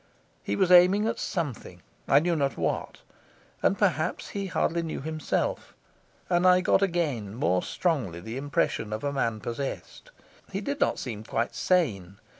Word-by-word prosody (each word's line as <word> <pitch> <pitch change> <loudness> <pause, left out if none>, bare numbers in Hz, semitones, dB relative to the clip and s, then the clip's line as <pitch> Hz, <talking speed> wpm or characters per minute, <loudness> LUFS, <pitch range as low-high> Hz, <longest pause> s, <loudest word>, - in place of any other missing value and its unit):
He 100 - -2
was 180 - +2
aiming 180 +4 +7
at 225 - -1
something, 130 - -4 0.2
I 140 - +5
knew 170 +3 +2
not 140 -3 0
what, - - -2 0.6
and - - +2
perhaps - - 0
he 200 -1 -4
hardly 170 -1 0
knew 165 -1 -4
himself; 155 +1 -2 0.5
and 175 0 +3
I 180 0 +6
got 185 - +3
again 150 - -1
more 90 -5 +1
strongly 130 - -1
the 110 +7 -7
impression 135 -6 -1
of 110 - -4
a 140 0 -1
man 115 -5 -1
possessed. 135 - -5 0.4
He 195 - -2
did 280 +7 -3
not - - +2
seem 110 -4 -5
quite 115 +1 -2
sane. 100 - 0
145 Hz, 160 wpm, -27 LUFS, 110-180 Hz, 0.6 s, aiming